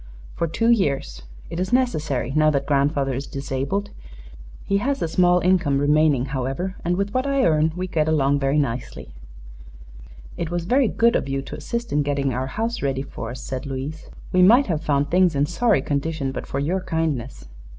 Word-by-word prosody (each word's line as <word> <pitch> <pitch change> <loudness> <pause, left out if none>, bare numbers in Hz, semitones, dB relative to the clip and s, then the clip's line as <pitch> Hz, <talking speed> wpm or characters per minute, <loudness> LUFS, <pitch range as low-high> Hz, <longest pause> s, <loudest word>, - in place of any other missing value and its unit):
"For 170 - -1
two 225 +8 +1
years. 140 - 0 0.3
It 165 - -4
is 185 +3 -2
necessary, 155 - 0
now 155 0 +4
that 140 -2 0
grandfather 140 -1 +1
is 135 +3 -4
disabled. 140 +9 -3 0.7
He 200 - +1
has 275 +6 -1
a - - -1
small 180 +2 +3
income 175 -6 +2
remaining, 145 -2 +3
however, 135 +8 -3
and 175 +1 0
with 200 +1 -2
what 255 +2 0
I 275 -1 +2
earn 155 -1 +3
we 180 +1 -3
get 155 -4 0
along 145 -2 +2
very 135 +1 +1
nicely." 120 - -3 1.2
"It 170 -2 -3
was 175 -1 -3
very 255 +5 +3
good 230 +2 +2
of - - -1
you 135 0 -2
to - - -8
assist 235 +10 -4
in 150 - +3
getting 140 -2 -1
our 130 +2 -2
house 225 - -3
ready 135 -1 -1
for 115 -4 -7
us," 125 0 -7
said 130 +1 -5
Louise. 140 +4 -6 0.2
"We 185 - +3
might 235 +9 +6
have 160 -5 -2
found 145 0 0
things 180 -3 +3
in 140 +1 +2
sorry 185 - +1
condition 145 -1 -2
but - - -6
for - - -4
your 175 +7 -1
kindness." 160 -8 -3
155 Hz, 190 wpm, -23 LUFS, 135-185 Hz, 1.2 s, might